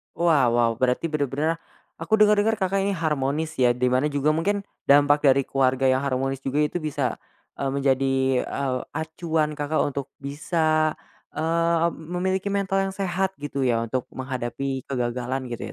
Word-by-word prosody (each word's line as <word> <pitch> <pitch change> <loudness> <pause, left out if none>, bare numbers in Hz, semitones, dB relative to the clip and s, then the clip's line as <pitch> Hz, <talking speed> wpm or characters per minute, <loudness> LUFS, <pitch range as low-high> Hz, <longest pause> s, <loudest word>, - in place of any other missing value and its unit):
Wow 155 -8 +3
wow, 120 -1 +3
berarti 130 +6 +1
bener-bener 150 +2 -1 0.4
aku - - -4
dengar-dengar 210 +1 +4
Kakak 195 -2 0
ini 200 - 0
harmonis, 155 -1 -1
ya, 125 -1 +4
di 125 +1 +1
mana 130 +3 +2
juga 145 0 +1
mungkin 195 +6 +1 0.2
dampak 145 +1 +5
dari 135 0 +5
keluarga 130 0 +1
yang 130 +2 +1
harmonis 135 0 -1
juga 140 +3 0
itu 150 +3 0
bisa, 145 -5 -2 0.4
eee, 140 - -1
menjadi, 135 -1 +1 0.3
eee, 130 -2 -2
acuan 160 -1 -2
Kakak 145 +2 0
untuk 140 -1 -3
bisa, 155 +2 0 0.4
eee, 165 +1 +1
memiliki 180 +4 -2
mental 195 -1 +1
yang - - -8
sehat 190 0 -1
gitu, 140 -2 -2
ya, 115 -2 +2
untuk 120 +2 -2
menghadapi 130 +1 -4
kegagalan 125 0 -3
gitu, 120 - -5
145 Hz, 155 wpm, -24 LUFS, 130-165 Hz, 0.4 s, dampak